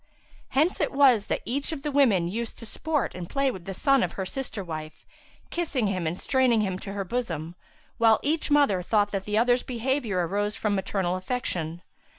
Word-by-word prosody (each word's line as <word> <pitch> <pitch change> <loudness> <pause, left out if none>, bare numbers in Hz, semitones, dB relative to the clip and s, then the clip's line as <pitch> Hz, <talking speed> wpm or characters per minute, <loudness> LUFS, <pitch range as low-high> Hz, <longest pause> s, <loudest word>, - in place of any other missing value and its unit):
[FN#357] - - -39 0.5
Hence 310 +7 +2
it - - +1
was 260 -7 +5
that - - -1
each 275 +7 -2
of 295 -4 -5
the 295 - -2
women 230 -12 +4
used 225 +5 -4
to 230 - -4
sport 300 +5 -1
and 175 -2 -7
play 275 -1 +1
with 185 -7 -9
the 195 - -4
son 275 +4 +3
of - - -1
her 190 - -3
sister 225 -1 -3
wife, 155 -2 -7 0.5
kissing 300 -9 -1
him 185 -4 -1
and 170 +3 -3
straining 255 -4 +3
him 190 -3 -2
to 195 0 -7
her 200 -1 -2
bosom, 175 -8 -3 0.5
whilst 225 -1 +5
each 310 +2 0
mother 285 -11 +4
thought 205 +2 +1
that 195 -1 -3
the 210 0 0
other's 245 +2 +3
behaviour 235 -6 -1
arose 205 +4 -1
but - - -12
from 210 -2 +1
maternal 190 -2 -1
affection. 180 -6 -3
215 Hz, 205 wpm, -26 LUFS, 185-265 Hz, 0.5 s, was